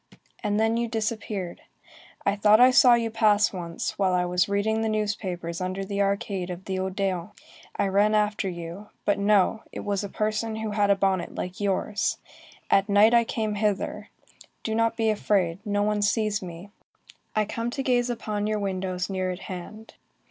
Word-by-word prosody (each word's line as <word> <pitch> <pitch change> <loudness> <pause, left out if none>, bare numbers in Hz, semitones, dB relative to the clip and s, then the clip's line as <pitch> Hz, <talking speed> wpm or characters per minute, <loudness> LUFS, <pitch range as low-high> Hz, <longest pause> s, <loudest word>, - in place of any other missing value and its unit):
And 210 0 0
then 225 +1 +2
you 235 0 0
disappeared. 215 -5 -3 0.6
I 200 - +2
thought 210 +1 +5
I 250 +1 +8
saw 250 -1 +7
you 230 -1 -1
pass 215 -1 +3
once, 170 0 -4
while 190 -2 +2
I 180 0 +2
was 180 +2 +1
reading 215 +2 +1
the 220 - 0
newspapers 190 -5 -2
under 185 +1 -3
the 200 0 -2
arcade 200 -2 -1
of 180 +1 -7
the 190 -1 -2
Odéon. 190 0 -2 0.4
I - - +1
ran 205 +2 +3
after 210 -2 +1
you. 175 +4 -7 0.2
But 205 -1 +2
no. 205 +1 +3
It - - -6
was 200 -1 -2
a 200 - -5
person 215 +2 -1
who 220 -1 -3
had 205 -1 +2
a 200 - +5
bonnet 190 -2 0
like 180 +2 -5
yours. 200 +1 0 0.5
At 195 +1 +4
night 205 +3 +6
I 235 0 +6
came 220 -2 -2
hither. 205 -1 -1 0.5
Do 220 - -2
not 230 +1 +1
be 225 -1 +2
afraid, 195 -3 0
no 205 -1 0
one 210 0 0
sees 210 0 +1
me. 180 +2 -9 0.6
I 215 -1 +2
come 230 +3 -3
to 270 +2 -3
gaze 245 -2 +2
upon 215 -3 -2
your 215 0 0
windows 185 -2 -2
near 185 -1 -2
at 180 0 -5
hand. 205 +5 -8
205 Hz, 185 wpm, -26 LUFS, 190-220 Hz, 0.6 s, I